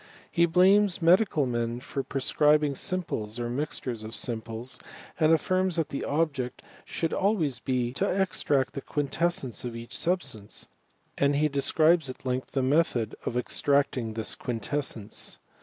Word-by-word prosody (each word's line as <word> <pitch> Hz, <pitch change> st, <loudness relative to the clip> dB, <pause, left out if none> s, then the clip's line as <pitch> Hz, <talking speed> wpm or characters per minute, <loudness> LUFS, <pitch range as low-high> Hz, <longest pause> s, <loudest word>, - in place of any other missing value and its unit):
He 170 Hz, 0 st, +3 dB
blames 190 Hz, +3 st, +4 dB
medical 175 Hz, -3 st, +4 dB
men 120 Hz, -1 st, -2 dB
for 135 Hz, +2 st, -4 dB
prescribing 150 Hz, +2 st, +2 dB
simples, 130 Hz, -, -2 dB
or 120 Hz, 0 st, -2 dB
mixtures 125 Hz, -4 st, -3 dB
of 110 Hz, +1 st, -5 dB
simples, 115 Hz, +1 st, -2 dB, 0.4 s
and 155 Hz, -1 st, +4 dB
afHrms 185 Hz, +2 st, +2 dB
that 165 Hz, -4 st, 0 dB
the 140 Hz, -, -3 dB
object 140 Hz, -5 st, -1 dB, 0.2 s
should 165 Hz, -, -2 dB
always 170 Hz, -, +1 dB
be 125 Hz, -1 st, -1 dB
to 195 Hz, +9 st, 0 dB
extract 180 Hz, -8 st, +1 dB
the 140 Hz, -, -5 dB
quintessence 145 Hz, -, -1 dB
of 120 Hz, -2 st, -5 dB
each 115 Hz, 0 st, -7 dB
substance; 140 Hz, -, -2 dB, 0.5 s
and 140 Hz, 0 st, +3 dB
he 150 Hz, +2 st, +3 dB
describes 155 Hz, +2 st, +3 dB
at 130 Hz, -, -9 dB
length 130 Hz, 0 st, -2 dB
the 135 Hz, -, +1 dB
method 130 Hz, -6 st, +1 dB
of 120 Hz, -, -1 dB
extracting 135 Hz, -3 st, +1 dB
this 110 Hz, -1 st, 0 dB
quintessence. 120 Hz, -2 st, -3 dB
140 Hz, 140 wpm, -28 LUFS, 120-165 Hz, 0.5 s, blames